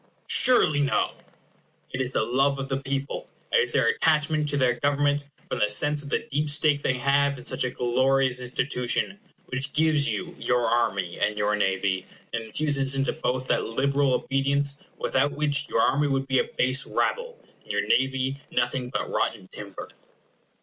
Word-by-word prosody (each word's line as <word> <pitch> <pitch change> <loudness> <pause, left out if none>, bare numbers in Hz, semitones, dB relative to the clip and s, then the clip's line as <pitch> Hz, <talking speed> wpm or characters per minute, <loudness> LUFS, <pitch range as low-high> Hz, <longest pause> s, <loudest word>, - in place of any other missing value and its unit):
surely 155 - +5
no! 140 -2 +1 0.8
It 130 - -2
is 130 0 -2
the - - +1
love 135 +4 +1
of 135 0 -4
the 135 - 0
people; 140 0 -4 0.2
it - - +4
is 470 - +3
their - - +3
attachment 155 - +1
to 145 - 0
their 125 -2 +1
government, 145 0 +1 0.2
from - - -3
the 105 - +2
sense 145 +7 +3
of 145 - -7
the - - -2
deep 150 +2 0
stake 150 -1 +3
they 130 - 0
have 140 +2 +1
in 125 - -11
such - - 0
a 125 - 0
glorious 130 +1 +1
institution, 125 +8 -2 0.3
which 135 +2 -1
gives 155 -2 +2
you 175 -1 -4
your 125 -1 +1
army 95 -7 0
and 105 +1 0
your 105 0 +1
navy, 95 -2 -1 0.3
and 115 - -2
infuses 135 +3 0
into 135 0 0
both 130 -4 -2
that - - 0
liberal 140 +3 +1
obedience 140 +2 0 0.2
without 140 +2 0
which 145 0 0
your - - 0
army 145 +1 +2
would 135 -1 -1
be 130 -1 +2
a - - +1
base 130 +2 +3
rabble, 485 0 -2 0.2
and - - -8
your - - -1
navy 135 +1 0
nothing 125 +1 -1
but - - -3
rotten 100 -5 -2
timber. 100 -2 -9
135 Hz, 175 wpm, -25 LUFS, 125-145 Hz, 0.8 s, surely